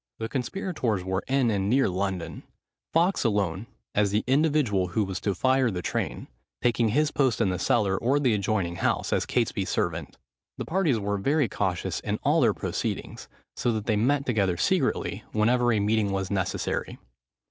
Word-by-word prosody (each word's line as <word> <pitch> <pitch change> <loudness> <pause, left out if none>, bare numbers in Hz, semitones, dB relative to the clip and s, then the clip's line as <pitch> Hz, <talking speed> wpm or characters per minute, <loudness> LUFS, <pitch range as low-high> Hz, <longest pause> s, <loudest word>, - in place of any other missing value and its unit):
The 110 - -3
conspirators 125 - -2
were 95 +1 -1
in 130 -3 +2
and 100 -1 0
near 135 +4 +3
London, 90 -4 -3 0.5
Fawkes 175 +4 +2
alone, 100 -3 0 0.3
as 105 -1 +2
the 105 +2 0
individual 135 - +2
who 105 +5 0
was 95 -1 -4
to 100 -1 -1
fire 130 +4 +2
the 90 -4 -4
train, - - -3 0.3
taking 120 -2 +2
his 150 +6 +2
post 130 -5 +1
in 95 - +2
the 90 -1 -2
cellar, 100 -1 +2
or 135 +5 +2
the 130 -5 +2
adjoining 100 -4 -1
house, - - 0
as - - 0
Catesby's - - 0
servant. 80 -4 -2 0.4
The - - -4
parties 165 -8 +1
were 100 -1 -2
very 145 +5 +2
cautious 95 -5 -2
in - - -2
all - - +3
their - - +3
proceedings, - - -4 0.3
so 120 - 0
that 110 -2 -3
they 110 - +1
met 140 +6 +1
together 100 -7 +1
secretly, - - 0
whenever 120 +3 +3
a 110 - +2
meeting 105 0 +1
was 95 0 -2
necessary. 95 -3 -2
110 Hz, 175 wpm, -26 LUFS, 95-130 Hz, 0.5 s, near